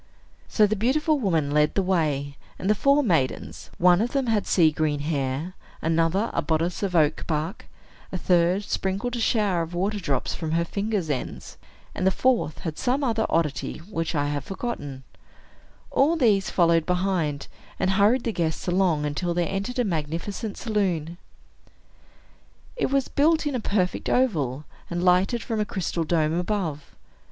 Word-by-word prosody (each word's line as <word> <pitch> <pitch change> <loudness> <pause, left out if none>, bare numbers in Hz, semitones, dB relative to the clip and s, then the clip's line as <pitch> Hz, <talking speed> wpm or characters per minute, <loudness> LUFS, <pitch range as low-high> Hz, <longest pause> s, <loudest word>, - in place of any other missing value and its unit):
So 215 - +4
the 210 +1 0
beautiful 295 - +1
woman 165 - 0
led 150 0 +2
the 195 - +2
way; 150 -6 0 0.2
and 185 - -4
the 210 - +5
four 280 +7 +3
maidens 160 - -1
(one 180 +2 +5
of 240 +2 -1
them 275 -2 +1
had 220 -3 0
sea 165 -4 +4
green 150 -2 -1
hair, 145 +2 -2 0.3
another 165 +6 +1
a - - +1
bodice 165 +2 -1
of 195 -3 -1
oak 155 -2 +2
bark, 160 +5 -3 0.4
a 185 - -2
third 180 +2 +2
sprinkled 200 +5 -2
a - - -3
shower 210 -6 +1
of 165 +1 -5
water 200 +4 -1
drops 140 -8 -1
from 160 -2 -3
her 170 +1 +1
fingers' 200 -3 -2
ends, 130 - -5 0.4
and 185 - 0
the - - +7
fourth 235 -6 +1
had 160 -4 -5
some 265 +3 0
other 225 -4 +1
oddity, 150 -6 -1
which 165 -2 -4
I 145 -1 +1
have 145 -1 -2
forgotten), 145 - -5 0.9
all 295 +5 +3
these 215 -10 +2
followed 170 -2 +3
behind, 180 -6 0 0.3
and 190 - +1
hurried 210 +6 +3
the 230 - -2
guests 160 -2 -2
along, 175 -4 +2
until 170 +4 -2
they 175 -1 +1
entered 195 +8 -3
a 250 - +2
magnificent 175 +4 -3
saloon. 180 -7 -1 1.6
It 480 - 0
was 275 -1 +1
built 315 +2 +2
in 295 - -1
a 250 - -1
perfect 195 -4 -1
oval, 150 - +1 0.2
and 175 0 -2
lighted 185 +6 +3
from 225 -3 -2
a - - +2
crystal 180 -4 -2
dome 155 -1 +1
above. 175 -5 -3
180 Hz, 165 wpm, -25 LUFS, 160-215 Hz, 1.6 s, the